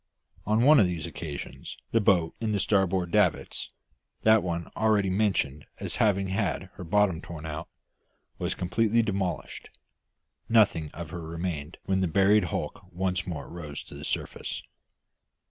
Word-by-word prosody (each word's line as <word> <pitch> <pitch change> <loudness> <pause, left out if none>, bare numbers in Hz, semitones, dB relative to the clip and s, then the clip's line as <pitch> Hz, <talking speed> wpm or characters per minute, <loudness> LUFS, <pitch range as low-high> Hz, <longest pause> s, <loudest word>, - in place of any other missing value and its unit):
On 110 +2 +3
one 150 +2 +8
of 100 - +5
these 85 -4 -3
occasions 70 -4 -7
the 115 - +3
boat 90 -6 +3
in 110 -2 0
the 100 - +1
starboard 95 -3 +2
davits - - +1 0.5
that 110 -1 +6
one 85 -1 -3
already 105 -3 +2
mentioned 95 -8 0
as - - -3
having 100 -3 +2
had 95 - -1
her - - -8
bottom 95 -2 +2
torn 80 -3 -8
out 80 +1 -5 0.7
was - - -1
completely 115 +5 +2
demolished, 95 -4 -3 0.8
nothing 100 -9 +4
of 85 0 -8
her 90 - -5
remaining 80 -1 -4
when 95 0 +1
the 95 - +2
buried 100 +3 +4
hulk 85 - -3
once 90 +1 -1
more 80 -5 -5
rose 75 -4 -6
to - - -13
the - - -8
surface. - - -3
95 Hz, 150 wpm, -28 LUFS, 85-105 Hz, 0.8 s, one